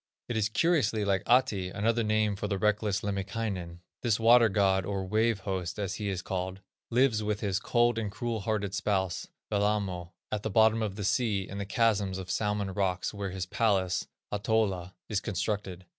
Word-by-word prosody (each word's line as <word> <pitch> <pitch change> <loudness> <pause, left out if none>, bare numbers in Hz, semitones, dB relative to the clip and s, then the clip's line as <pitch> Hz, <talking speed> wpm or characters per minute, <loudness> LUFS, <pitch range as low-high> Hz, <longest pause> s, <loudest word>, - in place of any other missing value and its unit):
It 120 - -3
is 110 -1 +1
curiously 120 -7 +2
like 95 -2 +2
Ahti, 110 -7 +3
another 115 +5 +1
name 110 -1 +1
for 105 +1 -3
the 100 -1 -1
reckless 105 0 +1
Lemminkainen. 100 -3 -3 0.2
This 115 -3 +1
water 115 0 +6
god, 95 -1 +2
or 95 0 -3
"Wave 110 +1 +1
host," 95 -3 -3
as 100 -2 -2
he 105 -1 -3
is 95 -2 -3
called, 95 0 -3 0.3
lives 120 -2 +3
with 105 0 -2
his 100 -3 0
"cold 120 -1 +2
and 105 -3 -3
cruel 115 +1 -3
hearted 100 -1 -2
spouse," 95 -2 -1 0.2
Wellamo, 100 -4 0 0.2
at 105 - -1
the 110 - -2
bottom 110 +2 +4
of 105 -3 -2
the 105 -2 -4
sea, 100 -3 +1
in 100 - -6
the 100 - -4
chasms 100 -3 +1
of 95 - -5
the - - 0
Salmon 105 -2 -1
rocks, 90 -1 -1
where 100 -1 -4
his 95 0 -4
palace, 95 -2 +1 0.2
Ahtola, 105 -4 0
is 105 -3 0
constructed. 95 -3 -3
100 Hz, 185 wpm, -29 LUFS, 95-110 Hz, 0.3 s, water